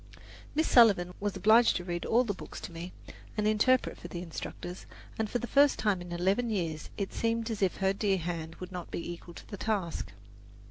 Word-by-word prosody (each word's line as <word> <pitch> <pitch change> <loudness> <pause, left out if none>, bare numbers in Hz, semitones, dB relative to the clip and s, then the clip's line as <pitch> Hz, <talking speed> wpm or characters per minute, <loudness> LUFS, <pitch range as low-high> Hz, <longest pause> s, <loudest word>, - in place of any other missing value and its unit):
Miss 315 +2 +2
Sullivan 200 -7 +6
was 205 -1 -2
obliged 225 +3 +6
to 175 - -2
read 175 -1 -3
all 240 +3 +4
the 215 -5 -2
books 185 - -9
to - - -7
me, 170 +2 -7 0.5
and 210 0 +2
interpret 230 +4 +3
for - - -8
the 175 0 -6
instructors, 175 +1 -7 0.3
and 220 -1 0
for 245 - 0
the 240 - -4
first 280 +3 +4
time 205 -4 +1
in 175 0 -8
eleven 190 +7 +1
years 165 -7 -2
it 200 -2 -3
seemed 230 0 0
as 215 - -4
if 190 -2 +1
her 190 0 +2
dear 195 -1 +1
hand 165 -2 -4
would 185 0 -8
not 180 -2 -6
be 170 - -4
equal 170 0 -10
to - - -11
the 200 - -7
task. 195 -5 -2
195 Hz, 215 wpm, -30 LUFS, 175-225 Hz, 0.5 s, Sullivan